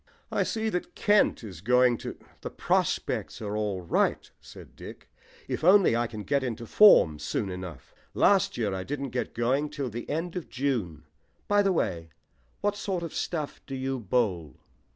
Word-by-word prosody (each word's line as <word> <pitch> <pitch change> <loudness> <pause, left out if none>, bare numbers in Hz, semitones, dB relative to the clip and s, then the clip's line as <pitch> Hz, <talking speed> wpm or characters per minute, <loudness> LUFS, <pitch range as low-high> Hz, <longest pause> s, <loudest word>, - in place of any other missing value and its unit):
"I - - +1
see 220 -1 -1
that 180 -4 -4
Kent 205 - +3
is 95 -6 -9
going 125 +3 +4
to - - -7
" - - -29
"The - - -5
prospects - - -1
are 105 -1 -4
all 105 -3 -2
right," 85 - 0
said - - -14
Dick, - - -11 0.4
"if - - -4
only 185 - +6
I 120 0 +1
can 110 -2 -7
get 140 +7 0
into 115 -2 -4
form 100 - +6
soon 95 +6 -2
enough. 90 -3 -8 0.2
Last 200 0 +3
year 105 -5 -1
I 95 -1 -3
didn't 140 +2 -4
get 125 0 -3
going 130 +6 +1
till 135 -5 -4
the 120 +2 -7
end 165 +4 -3
of 170 -10 -5
June. 115 - -2 0.4
By 205 0 +4
the 195 -1 +2
way, 85 - -1 0.5
what 205 0 0
sort 195 -4 -3
of 165 - -6
stuff 155 -4 -3
do 135 - -5
you 130 0 -2
bowl?" 95 - -1
125 Hz, 180 wpm, -27 LUFS, 105-170 Hz, 0.5 s, only